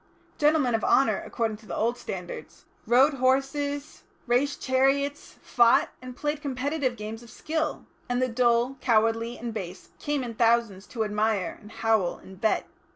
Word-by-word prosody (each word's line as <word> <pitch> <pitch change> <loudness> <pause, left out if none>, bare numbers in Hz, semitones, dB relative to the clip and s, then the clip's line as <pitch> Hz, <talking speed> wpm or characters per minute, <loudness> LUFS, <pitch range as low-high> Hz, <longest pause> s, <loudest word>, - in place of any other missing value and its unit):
Gentlemen 295 -4 +3
of 225 - 0
honour, 270 - +3
according 225 -3 -2
to 215 0 -18
the - - -4
old 235 +2 +1
standards, 180 -7 -8 0.2
rode 260 +6 +5
horses, 275 +3 0 0.2
raced 260 +4 +1
chariots, 275 +2 0
fought, 235 -1 +4
and 255 -1 -9
played 295 0 -2
competitive 275 -1 -1
games 220 +1 -7
of 235 - -14
skill, 315 +6 -3 0.2
and 245 0 0
the 255 - +2
dull, 240 +2 +2
cowardly 230 0 +2
and 235 -1 -5
base 185 -4 -7
came 290 -2 -1
in 235 -2 -5
thousands 225 -4 +1
to 225 -3 -2
admire, 210 -2 0
and 210 - -13
howl, 220 -5 +1
and 190 0 -14
bet. 220 - +1
240 Hz, 160 wpm, -27 LUFS, 220-270 Hz, 0.2 s, rode